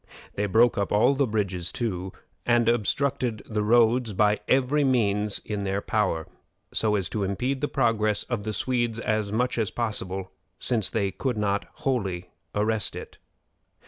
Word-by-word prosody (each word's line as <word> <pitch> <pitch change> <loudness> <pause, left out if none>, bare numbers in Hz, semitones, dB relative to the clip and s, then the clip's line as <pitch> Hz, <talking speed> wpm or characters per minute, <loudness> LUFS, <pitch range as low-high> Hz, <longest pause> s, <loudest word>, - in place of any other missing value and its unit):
They 105 +1 -1
broke 115 +3 +4
up 100 - -1
all 105 +6 +4
the 140 -1 +1
bridges 100 -5 -1
too, 95 -6 -3 0.3
and 120 -1 +3
obstructed 120 0 +1
the 105 -1 -1
roads 115 +1 +3
by 105 +2 +3
every 135 +3 +3
means 105 -6 +1
in 105 -2 -3
their 100 0 -1
power, 100 -7 0 0.5
so 105 -1 +2
as 95 -3 0
to 105 - -2
impede 125 +8 -1
the 145 - +1
progress 110 -6 +1
of 120 -5 -3
the 110 - -2
Swedes 120 +1 0
as 110 -3 -1
much 120 +2 0
as 110 - +1
possible, 95 -5 -3 0.3
since 115 -6 +1
they 100 -3 0
could 125 0 -2
not 100 -1 0 0.2
wholly 95 - -1 0.2
arrest 105 0 +1
it. - - -9
110 Hz, 160 wpm, -26 LUFS, 100-120 Hz, 0.5 s, broke